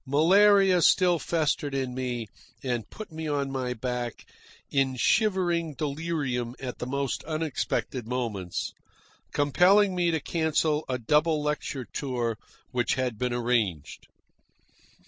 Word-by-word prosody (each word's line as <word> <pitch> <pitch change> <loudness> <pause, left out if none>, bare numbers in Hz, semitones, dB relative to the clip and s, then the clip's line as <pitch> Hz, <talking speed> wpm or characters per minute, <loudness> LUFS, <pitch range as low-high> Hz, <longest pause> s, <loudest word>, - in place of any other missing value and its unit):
Malaria 190 +5 +5
still 175 +1 +4
festered 150 -2 0
in 130 -2 -2
me 125 -2 -3 0.4
and 120 -4 -2
put 215 -4 -9
me 160 0 -5
on 140 -2 -1
my 130 -2 -2
back 125 0 -4 0.5
in 135 -2 +1
shivering 175 - +1
delirium 140 -5 -2
at 125 -2 -6
the 125 - -4
most 140 0 -2
unexpected 155 -6 -2
moments, 115 -8 -3 0.6
compelling 185 +8 +4
me 175 -1 +1
to 160 -1 +1
cancel 160 -1 0
a 130 - 0
double 150 +5 +2
lecture 150 -3 -2
tour 120 -5 -2 0.4
which 120 -1 +1
had 125 -4 -2
been 125 -1 0
arranged. 115 -10 -1
140 Hz, 125 wpm, -27 LUFS, 125-165 Hz, 0.6 s, Malaria